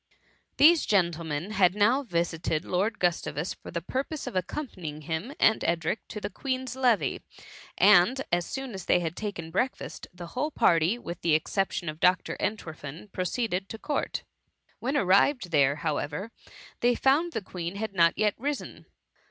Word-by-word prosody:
These 325 +2 +6
gentlemen 170 -2 0
had 190 -3 +3
now 230 +7 +4
visited 170 - -1
liOrd 200 +6 0
Gustavus, 175 -2 -1
for - - -12
the 170 0 -4
purpose 270 - -3
of 250 -6 -6
accompany 185 - -3
ing 150 +1 -9
him 160 - -3
and 220 - +4
Edric 170 +5 -1
to 210 - -6
the 205 - -5
Queen'^s 260 +2 -3
levee, 250 -5 +2 0.6
and 205 +5 +6
as 175 0 +1
soon 265 -3 -5
as 190 -2 -7
they - - +4
had 170 -1 -3
taken 180 -6 -5
breakfast, 255 +9 -2
the 175 -1 -9
whole 290 +5 -1
party, 170 - +3
with 170 -7 -7
the 165 -3 +3
exception 180 +2 -1
of 155 0 -4
Dr. 180 +1 +2
Entwerfen, 165 -3 -5
proceeded 190 0 -2
to 225 - -6
court. 290 +6 -2 0.6
When 270 +4 -1
arrived 195 +2 +3
there, 140 -2 +4
however, 150 +6 -3 0.5
they 245 0 +3
found 305 +8 +2
the 225 - -2
Queen 180 0 -5
had 215 0 -4
not 170 -2 +4
yet 210 -1 +2
risen. 285 +3 -4
190 Hz, 160 wpm, -28 LUFS, 170-240 Hz, 0.6 s, These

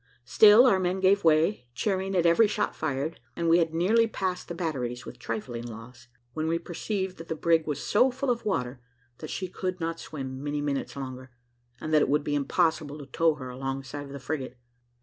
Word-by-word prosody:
Still 210 - +7
our 195 -7 +4
men 185 +1 0
gave 195 +1 +3
way, 160 - +3
cheering 195 -1 -1
at 175 -2 +2
every 170 +7 +5
shot 210 0 -1
fired, 150 +1 -3 0.2
and 170 - -1
we 165 +1 +5
had 165 -2 +1
nearly 210 +8 +3
passed 185 -4 -3
the 170 - -5
batteries, 130 -8 -3
with - - -10
trifling 115 +1 -4
loss, 120 +2 -11 0.3
when 155 +3 -2
we 165 +1 +1
perceived 190 +3 -4
that 165 - -9
the 160 - -3
brig 165 0 +2
was 145 -2 -3
so 245 +5 +4
full 260 +1 -1
of 235 -1 -2
water, 125 -10 -2 0.4
that 155 - -7
she 185 - -3
could 185 0 -4
not 165 0 -3
swim 135 -3 -6
many 145 0 -2
minutes 145 -1 -2
longer, 130 -1 -7 0.5
and 155 - -4
that 155 - +6
it - - +2
would 145 +1 +2
be 145 - -2
impossible 150 +1 0
to 145 - -9
tow 160 +4 +2
her 130 -3 -8
alongside 135 +2 -5
of - - -12
the 140 - -7
frigate. 135 -2 -4
160 Hz, 210 wpm, -27 LUFS, 135-185 Hz, 0.5 s, Still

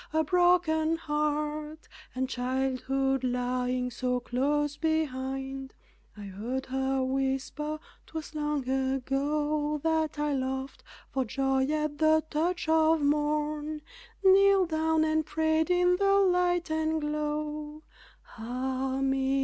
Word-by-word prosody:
a 315 0 +3
broken 335 -2 +3
heart, 300 0 -2 0.3
And 260 +1 -1
childhood 265 +1 -1
lying 250 0 -1
so 250 +1 -1
close 290 +4 0
behind. 270 -4 -2 0.4
I - - -9
heard 220 +7 -4
her 265 0 -1
whisper, 270 +3 -2 0.3
"'Twas 320 -1 -7
long 295 -3 -2
ago 285 +3 0
That 320 -1 0
I 295 0 0
laughed 265 0 -3 0.3
for 265 - 0
joy 265 +2 0
at 300 -1 -1
the 315 0 +4
touch 335 +3 -1
of 320 -1 +3
morn, 300 +1 0 0.4
Kneeled 390 -1 +5
down 320 0 +2
and 315 0 +1
prayed 315 +1 +1
in 360 0 +3
the 395 0 +3
light 360 -3 +2
and 315 0 0
glow 300 0 -3 0.6
Ah 260 +3 -2
me! 270 0 +1
295 Hz, 115 wpm, -29 LUFS, 265-315 Hz, 0.6 s, Kneeled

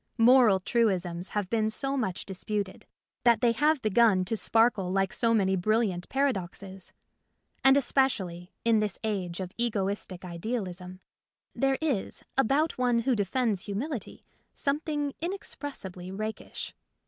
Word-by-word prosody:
Moral 235 -4 +6
truisms 185 -5 0
have 205 -3 -2
been 220 +1 +1
so 270 +5 -2
much 195 -9 -2
disputed 200 0 -4 0.4
that 235 -3 +5
they 240 - +4
have 295 +5 +2
begun 215 -3 +4
to 225 - -1
sparkle 225 -4 +2
like 195 0 +1
so 230 -2 +2
many 195 -4 +3
brilliant 195 -1 0
paradoxes. 195 -8 -2 0.7
And 270 +1 +7
especially 195 -11 0
(in 230 -2 +4
this 210 -2 -1
age 190 -5 -2
of 185 -1 -4
egoistic 200 -5 -2
idealism) 185 -1 -5 0.5
there 270 0 +1
is 275 -11 -1
about 275 +4 +2
one 245 -2 +3
who 255 +1 +1
defends 210 -1 0
humility 230 +5 -5 0.3
something 290 0 -1
inexpressibly 280 - -6
rakish. 215 +3 -5
215 Hz, 125 wpm, -28 LUFS, 190-255 Hz, 0.7 s, And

